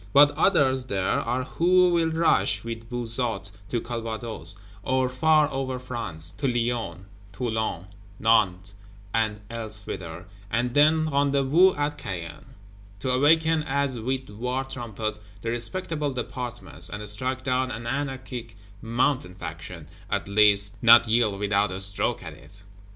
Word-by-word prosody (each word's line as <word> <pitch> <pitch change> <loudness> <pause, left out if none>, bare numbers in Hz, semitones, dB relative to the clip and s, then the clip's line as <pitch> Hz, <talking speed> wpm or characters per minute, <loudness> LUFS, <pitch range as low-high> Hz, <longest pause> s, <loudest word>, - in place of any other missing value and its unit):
But 145 +1 +7
others 140 -5 +2
there 95 -6 -2
are 125 +2 -1
who 180 +5 +3
will 165 -1 +2
rush, 105 -11 +2
with 115 0 -7
Buzot, 115 -4 0 0.2
to 120 - 0
Calvados; 115 -2 -1 0.2
or 130 +4 +1
far 150 +4 +3
over 135 -1 -3
France, 110 -10 -3
to 140 - 0
Lyons, 115 -7 -2 0.3
Toulon, 110 -4 -3 0.3
Nantes 100 -4 +2 0.4
and 110 -2 0
elsewhither, 100 -6 -7 0.2
and 120 +3 -1
then 155 +2 +4
rendezvous 140 +5 +3
at 145 0 -2
Caen: 85 -3 -7 0.4
to 130 - 0
awaken 160 +4 +3
as 140 -3 -1
with 130 +3 -3
war 125 +5 -2
trumpet 110 -5 -5 0.2
the 115 - -1
respectable 150 +5 -3
Departments; 120 -1 -4
and 105 0 -6
strike 130 +5 -2
down 130 0 0
an 115 -2 -6
anarchic 130 -3 -5 0.2
Mountain 115 -4 0
Faction; 85 -1 -8 0.2
at - - -2
least 100 +1 +4
not 115 0 +7
yield 110 -3 +2
without 100 0 +1
a 95 - -3
stroke 100 +1 +1
at - - -8
it. 100 +1 -17
120 Hz, 135 wpm, -25 LUFS, 105-135 Hz, 0.4 s, But